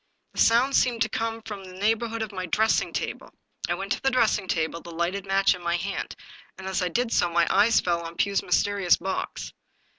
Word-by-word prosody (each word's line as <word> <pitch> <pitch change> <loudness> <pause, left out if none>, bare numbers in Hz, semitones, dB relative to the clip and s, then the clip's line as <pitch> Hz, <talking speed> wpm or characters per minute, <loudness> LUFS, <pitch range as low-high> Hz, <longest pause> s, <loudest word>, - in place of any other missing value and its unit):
The - - -7
sound 245 +4 +4
seemed 235 -2 +3
to 220 - -3
come 225 +1 -3
from 210 -3 -7
the 185 -1 -11
neighborhood 225 +2 0
of 215 - -6
my 185 -2 -5
dressing 220 +6 +2
table. - - -4 0.4
I - - +1
went - - -6
to - - 0
the 270 - +2
dressing 220 -6 +2
table, 165 -1 -1
the - - -11
lighted 175 +4 -2
match 195 0 +3
in 180 - -9
my 170 0 0
hand, 195 +2 -4 0.4
and, 190 - -9
as 190 0 -1
I 180 - 0
did 235 +6 -1
so, 175 - +3
my 170 0 +3
eyes 225 +2 +5
fell 170 -1 0
on 165 0 -8
Pugh's 200 -1 +1
mysterious 190 0 +2
box. 190 0 -4
195 Hz, 215 wpm, -26 LUFS, 180-225 Hz, 0.4 s, eyes